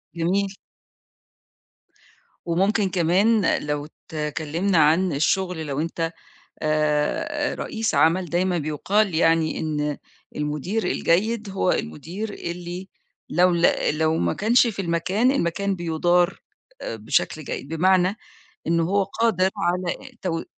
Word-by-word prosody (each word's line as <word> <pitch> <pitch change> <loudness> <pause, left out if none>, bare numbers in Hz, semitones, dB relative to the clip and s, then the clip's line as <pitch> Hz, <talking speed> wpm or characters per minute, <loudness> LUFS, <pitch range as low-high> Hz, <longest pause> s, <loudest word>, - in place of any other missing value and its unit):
جميل. 190 +4 0 1.9
وممكن 195 +4 +1
كمان 185 +4 +3
لو 150 0 -2 0.3
اتكلّمنا 160 +5 -1
عن 160 +3 +4
الشغل 170 +3 0
لو 140 0 -2
أنت، 165 0 -2 0.5
آآ 155 - 0
رئيس 225 -5 -2
عمل 165 +6 +3
دايمًا 175 +2 0
بيُقال 175 +6 0
يعني 165 -1 +2
إن 150 -2 -2 0.4
المدير 150 +9 -2
الجيد 205 +5 +1
هو 190 -1 +1
المدير 180 - -4
اللي 175 +2 -6 0.4
لو 180 +3 +4
ل 170 0 +4 0.3
لو 160 0 +2
ما - - +1
كانش 235 +4 +4
في 200 -4 -3
المكان، 180 +8 +1
المكان 200 -3 0
بيُدار 175 +2 +1 0.4
آآ - - -5
بشكل 110 +7 -1
جيد، 135 - -5
بمعنى 185 +3 +3 0.5
إن 170 +1 +2
هو 195 +5 +2
قادر 195 -2 +1
على 175 0 0 0.3
تو 175 -4 -1
آآ - - -6
175 Hz, 115 wpm, -23 LUFS, 160-195 Hz, 1.9 s, عن